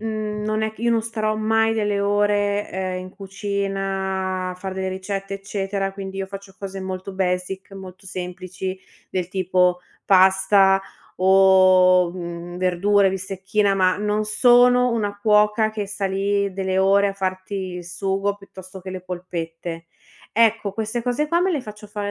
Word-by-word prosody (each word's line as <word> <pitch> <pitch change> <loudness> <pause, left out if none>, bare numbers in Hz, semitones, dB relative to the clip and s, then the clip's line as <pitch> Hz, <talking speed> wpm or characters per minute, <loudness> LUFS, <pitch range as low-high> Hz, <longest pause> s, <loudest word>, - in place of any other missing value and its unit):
mhmm, 215 -1 -3
non 215 +1 -1
è 220 0 -1
c - - -24
io 235 +1 +1
non 230 -1 +2
starò 215 -1 -2
mai 225 +1 +2
delle 205 -2 0
ore, 205 0 +1
ehm, 185 -1 -3
in 185 0 -9
cucina 195 -1 -3
a - - -9
fare 190 +1 -6
delle 190 0 -2
ricette, 195 +1 -4
eccetera, 195 0 -3
quindi 195 -1 -7
io 195 - -2
faccio 195 0 -10
cose 195 -1 -6
molto 190 +1 -5
basic, 190 +1 -2
molto 190 -1 -11
semplici 185 0 -5 0.3
del 180 -2 -2
tipo 180 -1 +1 0.3
pasta 190 +1 +5 0.4
o, 185 -1 +5
mhmm, 175 -1 -6
verdure, 190 +2 +2
bistecchina, 195 +2 -1
ma 185 -1 +2
non 210 +1 0
sono 245 +3 +5
una 205 -3 -2
cuoca 210 +1 +3
che 215 -2 -4
sta 200 0 -3
lì 200 +1 0
delle 190 -1 -1
ore 200 +1 +4
a - - -3
farti 185 0 -4 0.2
il 180 -1 -7
sugo 195 +3 -1
piuttosto 190 -1 -12
che 185 - -10
le 185 -1 -6
polpette. 170 -2 -6 0.4
Ecco 220 -3 +2
queste 220 +3 -3
cose 250 +5 -1
qua 340 +2 +2
me 380 - +2
le 310 -6 0
faccio 210 -2 -10
fare 205 -1 -4
195 Hz, 160 wpm, -22 LUFS, 185-210 Hz, 0.4 s, pasta